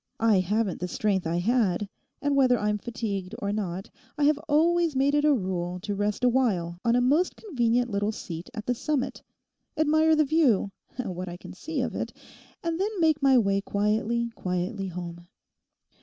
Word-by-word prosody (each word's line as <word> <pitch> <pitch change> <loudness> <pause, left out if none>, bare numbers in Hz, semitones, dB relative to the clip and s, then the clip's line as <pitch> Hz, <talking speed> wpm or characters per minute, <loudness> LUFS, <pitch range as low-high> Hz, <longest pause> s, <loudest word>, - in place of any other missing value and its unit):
I 225 -4 +4
haven't 200 +2 0
the 180 - -2
strength 190 -2 0
I 170 +1 0
had, 205 -1 +1 0.4
and 285 -1 +2
whether 255 -3 +4
I'm 210 -1 0
fatigued 215 -4 -4
or 200 - -2
not, 195 -3 -3 0.3
I 295 - 0
have 295 0 +4
always 330 +1 +3
made 275 +2 +2
it 295 0 +3
a 300 - +5
rule 180 -4 -3
to 205 - -3
rest 205 +4 -1
awhile 210 -10 +1
on 235 0 +3
a 245 - +3
most 295 +9 +2
convenient 245 - 0
little 205 -1 -1
seat 170 -5 -7
at 215 -2 -5
the 245 - +1
summit, 275 +2 -2 0.6
admire 315 +1 +4
the 305 0 +3
view—what 220 - 0
I 175 - -7
can - - -10
see 290 - -3
of 250 - -2
it—and 335 0 -6
then 415 0 -1
make 315 -3 +3
my 270 -1 +5
way 200 -3 +2
quietly, 220 +4 0
quietly 185 +2 -2
home. 175 -1 -7
225 Hz, 170 wpm, -27 LUFS, 190-280 Hz, 0.6 s, a